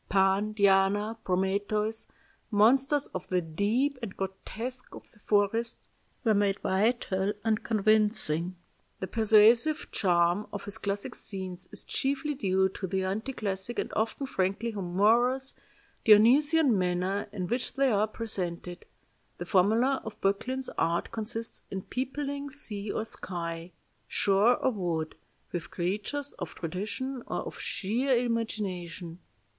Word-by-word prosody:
Pan, 195 Hz, +2 st, +2 dB
Diana, 205 Hz, +2 st, +3 dB
Prometheus, 205 Hz, +4 st, 0 dB, 0.4 s
monsters 265 Hz, +7 st, +4 dB
of -, -, -6 dB
the 185 Hz, -, +2 dB
deep 210 Hz, -, 0 dB
and 215 Hz, -5 st, -6 dB
grotesques 225 Hz, +6 st, -5 dB
of -, -, -12 dB
the 210 Hz, -, -24 dB
forest, 210 Hz, +3 st, +1 dB, 0.5 s
were 225 Hz, -3 st, +4 dB
made 200 Hz, -1 st, +2 dB
vital 200 Hz, -1 st, +1 dB
and 220 Hz, -1 st, +1 dB
convincing.... 210 Hz, -6 st, +2 dB, 0.4 s
The -, -, -2 dB
persuasive 225 Hz, +8 st, +4 dB
charm 175 Hz, +1 st, +2 dB
of 200 Hz, -, -5 dB
his 205 Hz, +2 st, -5 dB
classic 200 Hz, -1 st, -2 dB
scenes 185 Hz, -2 st, -5 dB
is -, -, -6 dB
chiefly 285 Hz, +2 st, -1 dB
due 190 Hz, -7 st, +2 dB
to 190 Hz, 0 st, -5 dB
the 190 Hz, +1 st, -1 dB
anti 210 Hz, +7 st, -2 dB
classic 200 Hz, -1 st, -3 dB
and -, -, -2 dB
often 225 Hz, +5 st, -1 dB
frankly 200 Hz, 0 st, -1 dB
humorous, 225 Hz, +8 st, +2 dB, 0.5 s
Dionysian 260 Hz, +6 st, +6 dB
manner 185 Hz, +2 st, 0 dB
in 185 Hz, -, -3 dB
which 245 Hz, +4 st, -2 dB
they 270 Hz, -1 st, +3 dB
are 210 Hz, 0 st, +2 dB
presented.... 180 Hz, -6 st, -4 dB, 0.5 s
The -, -, -5 dB
formula 225 Hz, +8 st, +3 dB
of 220 Hz, -1 st, -8 dB
Böcklin's 255 Hz, +7 st, -1 dB
art 170 Hz, +1 st, 0 dB
consists 225 Hz, +1 st, -3 dB
in 190 Hz, -1 st, -4 dB
peopling 280 Hz, +2 st, -3 dB
sea 215 Hz, -8 st, -4 dB
or 220 Hz, -, -2 dB
sky, 170 Hz, -4 st, -5 dB, 0.4 s
shore 205 Hz, +5 st, +3 dB
or 260 Hz, -, +1 dB
wood, 170 Hz, -7 st, -2 dB, 0.4 s
with 175 Hz, -2 st, -4 dB
creatures 210 Hz, +11 st, -3 dB
of -, -, -6 dB
tradition 215 Hz, -, -4 dB
or -, -, -2 dB
of -, -, -8 dB
sheer 245 Hz, +7 st, 0 dB
imagination. 195 Hz, -8 st, -3 dB
210 Hz, 130 wpm, -29 LUFS, 190-235 Hz, 0.5 s, Dionysian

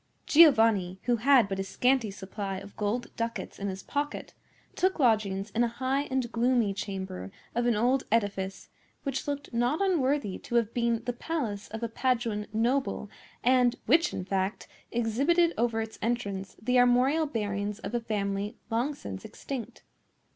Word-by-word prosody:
Giovanni, 225 Hz, -, +5 dB
who 240 Hz, 0 st, +2 dB
had 250 Hz, -1 st, +5 dB
but 195 Hz, -1 st, -3 dB
a -, -, 0 dB
scanty 250 Hz, +3 st, +1 dB
supply 195 Hz, 0 st, -5 dB
of 200 Hz, +1 st, -10 dB
gold 220 Hz, +4 st, -2 dB
ducats 230 Hz, 0 st, -4 dB
in 200 Hz, -, -2 dB
his 190 Hz, -1 st, -5 dB
pocket, 290 Hz, +1 st, -3 dB, 0.4 s
took 375 Hz, +1 st, +1 dB
lodgings 215 Hz, -, +1 dB
in 235 Hz, +4 st, +2 dB
a -, -, +3 dB
high 260 Hz, +4 st, -1 dB
and 260 Hz, -3 st, -2 dB
gloomy 235 Hz, -3 st, +2 dB
chamber 190 Hz, -, -5 dB, 0.2 s
of 240 Hz, +1 st, +1 dB
an 240 Hz, -, +3 dB
old 250 Hz, +5 st, +2 dB
edifice 200 Hz, -4 st, -1 dB, 0.3 s
which 275 Hz, -1 st, -3 dB
looked 285 Hz, -2 st, -4 dB
not 240 Hz, +6 st, +1 dB
unworthy 285 Hz, -, +1 dB
to 240 Hz, -, -5 dB
have 230 Hz, -2 st, +2 dB
been 235 Hz, -1 st, 0 dB
the 245 Hz, -, -1 dB
palace 235 Hz, -8 st, -3 dB
of 220 Hz, +2 st, -6 dB
a -, -, +1 dB
Paduan 230 Hz, -3 st, -1 dB
noble, 230 Hz, -1 st, 0 dB, 0.3 s
and 250 Hz, -1 st, +4 dB
which, 320 Hz, +8 st, +4 dB
in 185 Hz, -, -4 dB
fact, 195 Hz, +1 st, -2 dB, 0.2 s
exhibited 280 Hz, +10 st, +2 dB
over 230 Hz, -1 st, +1 dB
its 220 Hz, 0 st, -7 dB
entrance 205 Hz, -4 st, -2 dB
the 250 Hz, +3 st, +2 dB
armorial 255 Hz, +6 st, +4 dB
bearings 205 Hz, -4 st, -2 dB
of 225 Hz, -, -7 dB
a 240 Hz, -, 0 dB
family 205 Hz, 0 st, -2 dB
long 250 Hz, +6 st, 0 dB
since 290 Hz, -, -7 dB
extinct. 265 Hz, -4 st, -7 dB
230 Hz, 160 wpm, -29 LUFS, 205-260 Hz, 0.4 s, Giovanni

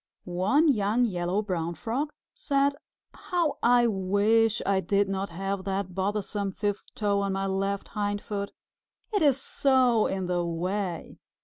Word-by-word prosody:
One 190 Hz, -, +2 dB
young 225 Hz, -2 st, +3 dB
Yellow 180 Hz, 0 st, -1 dB
Brown 170 Hz, -4 st, -2 dB
Frog 255 Hz, -, -2 dB, 0.2 s
said, 280 Hz, -, +1 dB, 0.4 s
"How 345 Hz, -4 st, -1 dB
I 240 Hz, 0 st, +5 dB
wish 215 Hz, +2 st, +2 dB
I 195 Hz, -1 st, +2 dB
did 200 Hz, +1 st, +1 dB
not 195 Hz, 0 st, -2 dB
have 195 Hz, +3 st, -3 dB
that 195 Hz, -1 st, -2 dB
bothersome 200 Hz, +1 st, -2 dB
fifth 205 Hz, 0 st, -3 dB
toe 205 Hz, -1 st, +1 dB
on 200 Hz, -1 st, -1 dB
my 195 Hz, 0 st, -1 dB
left 195 Hz, +1 st, -2 dB
hindfoot! 205 Hz, -1 st, -3 dB, 0.6 s
It 410 Hz, -, +2 dB
is 280 Hz, -4 st, +4 dB
so 255 Hz, -5 st, +3 dB
in 190 Hz, -1 st, -2 dB
the 175 Hz, -1 st, 0 dB
way! 175 Hz, +2 st, -3 dB
200 Hz, 140 wpm, -27 LUFS, 190-235 Hz, 0.6 s, I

